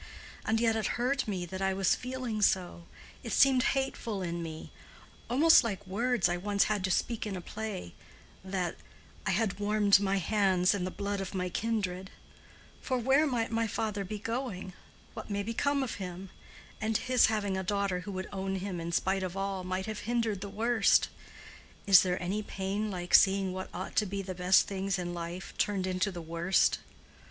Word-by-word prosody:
And 220 0 +1
yet 225 -1 +2
it 220 -3 0
hurt 260 +2 0
me 185 -4 -2
that 190 +2 -6
I 190 0 +1
was 190 -1 +3
feeling 250 -4 -3
so—it 185 +4 -2
seemed 270 -2 +5 0.2
hateful 230 -7 -2
in 170 -1 -3
me—almost 245 - +1
like 205 -3 -4
words 230 +3 +1
I 175 - -1
once 200 +2 +1
had 210 -3 -1
to - - -1
speak 220 +4 0
in 200 - -3
a - - -4
play, 205 - -6 0.5
that 185 -2 -2 0.5
'I - - +2
had 195 +1 0
warmed 205 -1 +4
my 195 -1 +1
hands 190 -1 +2
in 190 -3 -2
the - - -2
blood 200 +1 -3
of 195 0 -6
my 180 -1 -1
kindred.' 195 -3 -2 0.7
For 255 - -1
where 265 +5 +3
might 235 -4 -1
my 225 0 +1
father 210 -1 -2
be 210 +3 -5
going? 220 -4 -4 0.4
What - - -8
may 200 0 -1
become 275 +6 0
of 250 - -3
him? 185 0 -7 0.5
And 215 0 +1
his 255 -1 +3
having 205 -3 -1
a 190 - -1
daughter 200 -1 -1
who 200 +3 -7
would 185 0 -4
own 195 0 -2
him 190 -2 -4
in 170 +1 -4
spite 190 +3 +1
of 185 0 -4
all, 195 -1 -2
might 185 +1 -2
have 215 -1 -5
hindered 230 -5 0
the 200 - -5
worst. 225 +1 +3 0.8
Is 195 -3 +8
there 180 -1 0
any 190 +4 -2
pain 200 +1 -3
like 180 -2 -5
seeing 195 -1 +5
what 185 0 -5
ought 185 +2 -6
to 210 - +3
be 195 +1 -3
the 185 0 -5
best 180 +1 +4
things 195 0 -2
in 175 -1 -4
life 170 +2 -6
turned 200 -3 +1
into 185 +2 0
the 175 -2 -7
worst? 170 +3 +2
195 Hz, 185 wpm, -30 LUFS, 185-220 Hz, 0.8 s, Is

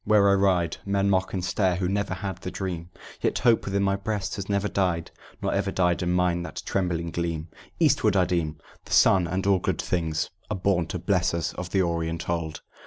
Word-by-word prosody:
Where 100 -2 +5
I - - +5
ride, 95 -4 +2
Men 100 0 +1
mock 95 -1 +1
and 90 -2 -2
stare, 90 0 +1
who 90 +1 -1
never 100 +2 -1
had 95 -3 -4
the - - -5
dream, 90 -3 -4 0.3
Yet - - +1
hope 115 -2 +3
within 100 0 0
my 100 0 +2
breast 100 0 -3
has 100 0 -5
never 100 0 +1
died." 90 -5 -1 0.3
"Nor - - 0
ever - - 0
died 90 -1 +1
in 90 0 0
mine 90 -1 +2
that 90 - -6
trembling 85 -3 -1
gleam." 85 -1 -3 0.3
"Eastward, 145 - +3
I 95 -2 +4
deem: 85 -4 -1 0.3
the - - -5
sun 90 -3 +5
and 95 +3 -2
all 100 -2 +4
good - - -1
things 80 -3 -1 0.2
Are 105 - -2
born 90 -3 +1
to - - -3
bless 90 -1 +1
us 85 -2 -2
of 90 -1 -6
the 95 +1 +2
Orient 85 -1 -2
old." 85 -2 -2
90 Hz, 215 wpm, -26 LUFS, 85-100 Hz, 0.3 s, Where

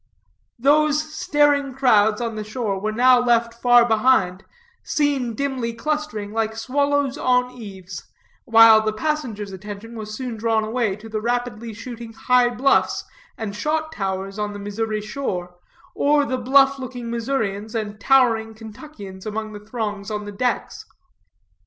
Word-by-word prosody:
Those 305 +4 +2
staring 290 -5 +2
crowds 220 -5 +3
on 230 -1 -2
the 215 - -4
shore 215 -3 -3
were 215 +2 -2
now 250 +3 +5
left 235 -1 +2
far 245 -1 +6
behind, 215 -5 +2 0.4
seen 280 -6 0
dimly 260 -4 -2
clustering 230 -5 -3
like 220 0 -1
swallows 285 +3 0
on 250 0 +2
eaves; 195 -7 -9 0.4
while 225 -2 +7
the 215 0 -1
passengers' 225 -6 -3
attention 205 +4 -9
was 215 -1 -6
soon 245 -2 -5
drawn 220 0 +1
away 220 -2 -1
to 210 +2 -12
the 215 -1 -4
rapidly 240 -1 -2
shooting 225 +1 -9
high 250 +1 +3
bluffs 250 +3 +2 0.3
and 210 -3 -5
shot 315 +7 -1
towers 195 -4 -4
on 210 0 -2
the 205 - -7
Missouri 215 +1 -3
shore, 205 -6 -4 0.4
or 290 0 +2
the 255 -2 -2
bluff 270 +2 +4
looking 245 -2 -6
Missourians 225 -3 -2
and 210 -1 -4
towering 225 -3 +3
Kentuckians 220 -4 -10
among 215 0 -4
the 210 - -7
throngs 210 -2 -5
on 210 -1 -4
the 205 - -6
decks. 230 +2 -2
230 Hz, 145 wpm, -22 LUFS, 210-260 Hz, 0.4 s, while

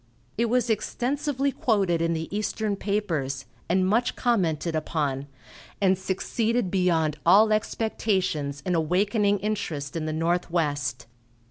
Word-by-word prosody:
It 235 - +1
was 245 +2 +1
extensively 275 +5 -1
quoted 195 -10 +1
in 165 0 +1
the 160 0 -3
eastern 210 0 -1
papers, 165 -11 -2 0.2
and 185 +1 +3
much 235 +5 +1
commented 170 - 0
upon, 145 -3 -1 0.5
and 190 -1 +4
succeeded 195 +3 -1
beyond 165 -5 +1
all 210 +5 +6
expectations 190 -10 -1
in 180 - 0
awakening 200 +5 +2
interest 175 -9 -3
in 160 -1 -2
the - - -1
Northwest. 160 -7 -1
185 Hz, 120 wpm, -26 LUFS, 160-215 Hz, 0.5 s, all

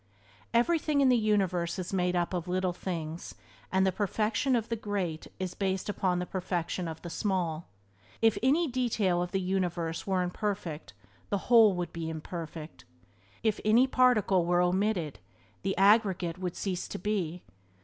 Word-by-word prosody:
Everything 295 +4 +2
in 275 -2 +5
the 250 - +5
universe 195 -6 +1
is 185 0 -5
made 180 -1 +1
up 175 +1 0
of 175 -1 -2
little 185 0 0
things, 170 -3 -5 0.4
and 190 0 +3
the 190 - +3
perfection 215 +6 0
of 230 -2 -1
the 230 - -1
great 195 -7 -3
is 185 -1 -3
based 190 0 -2
upon 185 -3 0
the 180 - -2
perfection 180 -1 -3
of 160 -1 -6
the 175 - -5
small. 175 -5 -1 0.5
If 225 -1 +4
any 295 +7 +3
detail 225 -9 +1
of 180 - -2
the 195 - 0
universe 180 -3 -2
were 190 -2 +1
imperfect 180 - -4 0.4
the 200 - +1
Whole 225 -5 +7
would 175 -1 -4
be 165 -1 -4
imperfect. 160 0 -7 0.6
If 220 -2 +1
any 225 +4 +5
particle 245 -8 +3
were 175 +1 +3
omitted 180 -4 0 0.4
the 195 0 -2
aggregate 195 -4 +3
would 180 -2 -3
cease 185 -3 -3
to - - -5
be. 180 -4 -2
185 Hz, 160 wpm, -29 LUFS, 175-215 Hz, 0.6 s, Whole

